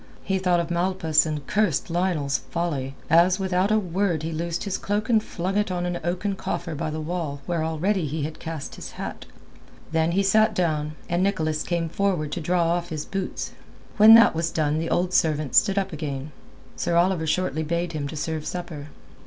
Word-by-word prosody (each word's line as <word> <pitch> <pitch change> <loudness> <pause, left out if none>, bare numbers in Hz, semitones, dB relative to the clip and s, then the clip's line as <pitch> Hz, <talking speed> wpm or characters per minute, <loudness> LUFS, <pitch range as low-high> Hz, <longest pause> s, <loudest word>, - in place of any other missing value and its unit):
He 190 -1 0
thought 180 -2 +2
of 170 0 -2
Malpas 170 -3 +2
and 150 -3 -4
cursed 210 -2 0
Lionel's 165 -6 0
folly, 135 -4 -2
as, 170 +4 +5
without 190 0 +1
a 215 - +4
word, 180 -4 0
he 165 - -3
loosed 170 +1 -3
his 200 -2 -2
cloak 210 +3 -2
and 225 -2 +4
flung 185 +1 -3
it 210 -1 +1
on 180 -1 -2
an 175 -1 -2
oaken 180 +4 -1
coffer 170 -2 -4
by 150 - -3
the 155 +1 -4
wall 155 -3 -3
where 170 -2 -1
already 165 +2 0
he 150 +1 -3
had 155 +1 -5
cast 160 -3 -6
his - - -8
hat. - - -7 0.6
Then 160 +1 +1
he 195 +2 +2
sat 215 +2 +3
down, 155 -4 0
and 175 +1 0
Nicholas 160 -6 0
came 170 -1 -1
forward 170 -3 -1
to 175 - -3
draw 175 +2 +1
off 170 +1 0
his 155 -2 -4
boots. 195 -1 -4 0.5
When 220 +1 +10
that 230 - +7
was 165 +1 -1
done 150 -3 0
and 155 - 0
the 165 - -2
old 180 +1 0
servant 155 -4 +1
stood 200 -2 +4
up 195 -2 0
again, 145 -2 -4 0.4
Sir 170 0 -1
Oliver 170 -2 +2
shortly 180 -1 0
bade 170 +2 -1
him 145 -2 -3
to 155 - -7
serve 155 0 -3
supper. 170 -5 -5
170 Hz, 200 wpm, -24 LUFS, 155-185 Hz, 0.6 s, When